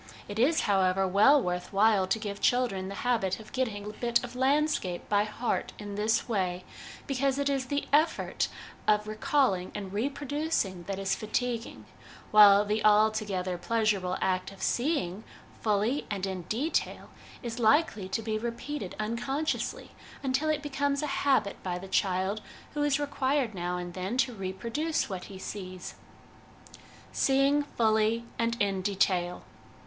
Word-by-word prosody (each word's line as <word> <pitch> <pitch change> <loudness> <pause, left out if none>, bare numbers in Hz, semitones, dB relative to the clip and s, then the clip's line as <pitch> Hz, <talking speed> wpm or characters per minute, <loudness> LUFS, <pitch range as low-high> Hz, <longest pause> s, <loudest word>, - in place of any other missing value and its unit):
It 205 +1 -5
is, 300 +7 +4
however, 190 -1 +2
well 210 +10 +6
worth 180 -5 -3
while 200 -1 +4
to 205 - +1
give 205 -2 -5
children 240 -7 +1
the 200 - -6
habit 225 -7 +1
of 215 - -12
getting 225 -6 -2
a - - -4
bit 235 +2 +1
of 245 0 -7
landscape 265 - +1
by 205 0 +2
heart 215 +3 -2
in 205 -1 -7
this 215 +3 +1
way, 185 -5 -1 0.4
because 275 0 0
it 280 0 +1
is 270 -2 -1
the 285 +2 -2
effort 310 +3 +2 0.4
of 210 0 +3
recalling 215 -3 +1
and 200 -2 -5
reproducing 275 - -1
that 195 0 -3
is 195 0 0
fatiguing; 235 +2 -3 0.5
while 205 -1 +8
the 210 +1 -1
altogether 210 -4 +2
pleasurable 205 -4 0
act 185 0 0
of 195 - -10
seeing, 240 - 0 0.4
fully 215 +6 +1
and 200 -2 -2
in 190 -2 -4
detail, 275 +9 -1 0.3
is 235 0 -4
likely 220 - +2
to 225 +4 -2
be 215 -1 -1
repeated 235 -1 -5
unconsciously 245 +8 -2 0.3
until 270 +3 +1
it 300 -1 0
becomes 285 0 -1
a 280 -2 -2
habit 265 -8 +1
by 180 -1 -3
the 190 +2 -8
child 190 +2 0 0.3
who 295 - -2
is 290 -1 +2
required 280 -4 0
now 180 -1 -2
and 175 0 -6
then 190 +6 -3
to 260 -1 +2
reproduce 230 - -2
what 185 -1 -5
he 195 - -10
sees. 185 -2 -7 1.2
Seeing 275 +2 +3
Fully 225 -3 +1
and 230 0 0
in 195 -2 +1
Detail. 185 -2 0
215 Hz, 150 wpm, -29 LUFS, 195-265 Hz, 1.2 s, while